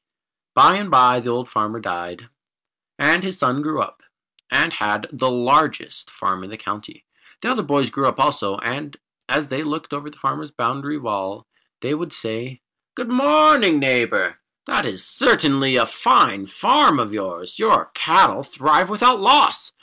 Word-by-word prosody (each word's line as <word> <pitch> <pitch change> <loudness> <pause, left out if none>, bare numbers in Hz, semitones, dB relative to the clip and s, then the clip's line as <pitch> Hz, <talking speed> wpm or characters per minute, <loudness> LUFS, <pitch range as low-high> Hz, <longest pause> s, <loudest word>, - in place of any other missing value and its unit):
By 185 - +7
and 205 -1 -5
by 125 -4 +5
the 120 0 -6
old 120 +1 -3
farmer 110 0 -3
died, 90 +1 -7 0.7
and 155 +5 +3
his 190 -1 -6
son 130 -4 -1
grew 155 +1 -4
up, - - -11 0.5
and - - +2
had 105 0 -2
the 130 -2 -2
largest 125 -1 0
farm 95 0 -4
in 95 - -12
the 110 - -11
country. 105 -1 -9 0.4
The - - 0
other - - -1
boys 140 -3 -1
grew 135 -1 -1
up - - -2
also, 135 -9 -1
and 140 +7 -6 0.3
as 150 -1 -1
they 130 +3 -4
looked 155 0 -6
over 145 +1 -7
the 150 - -21
farmer's 150 +3 -4
boundary 140 +2 -4
wall, 100 -7 -6 0.4
they 130 +4 -3
would 160 +1 -6
say: 125 -1 -8 0.3
"Good 245 -1 -6
morning, 280 - +4
Neighbour. 130 -4 0 0.3
That - - -1
is - - -7
certainly 135 -3 +2
a 125 - +3
fine 95 0 +2
farm 95 -1 +3
of 105 - -3
yours. 90 -4 -7
Your - - +2
cattle - - +3
thrive 155 +6 +1
without 245 +3 +3
loss. 260 +8 +4
135 Hz, 165 wpm, -19 LUFS, 110-155 Hz, 0.7 s, By